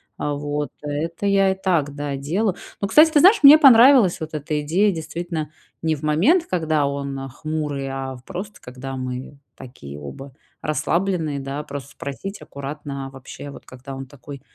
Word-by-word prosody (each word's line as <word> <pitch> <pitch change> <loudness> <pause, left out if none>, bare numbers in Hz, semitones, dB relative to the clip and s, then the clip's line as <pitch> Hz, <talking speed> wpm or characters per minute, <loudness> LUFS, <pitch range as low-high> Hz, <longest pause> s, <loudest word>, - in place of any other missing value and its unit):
А 145 - -2
вот, 145 0 -3
это 155 +6 -4
я 195 -1 +4
и - - -2
так, 155 -7 +1
да, 145 -1 -4
делаю. 180 +9 -1 0.2
Но, 200 - -1
кстати, 310 +8 +6
ты 300 - +5
знаешь, 380 +9 +7
мне 285 +2 +11
понравилась 250 - +7
вот 160 0 -6
эта 150 0 -2
идея, 190 +7 +2
действительно, 165 -1 -5 0.3
не 160 -1 +1
в 145 - -14
момент, 200 - +3
когда 155 -4 +1
он, 140 -1 -3
а, 135 - -6
хмурый, 145 0 -4
а 135 0 -4
в 125 - -14
просто 190 +4 -7
когда 130 +2 -7
мы 130 +2 -6 0.2
такие 75 - -10
оба 130 - -9 0.3
расслабленные, 160 -1 -1
да, 140 +2 -4
просто 140 -2 -7
спросить 195 +11 -7
аккуратно 140 -1 -7
вообще, 135 +2 -10
вот, - - -12
когда 130 +2 -10
он 135 0 -6
такой 140 +1 -11
150 Hz, 175 wpm, -22 LUFS, 135-180 Hz, 0.3 s, мне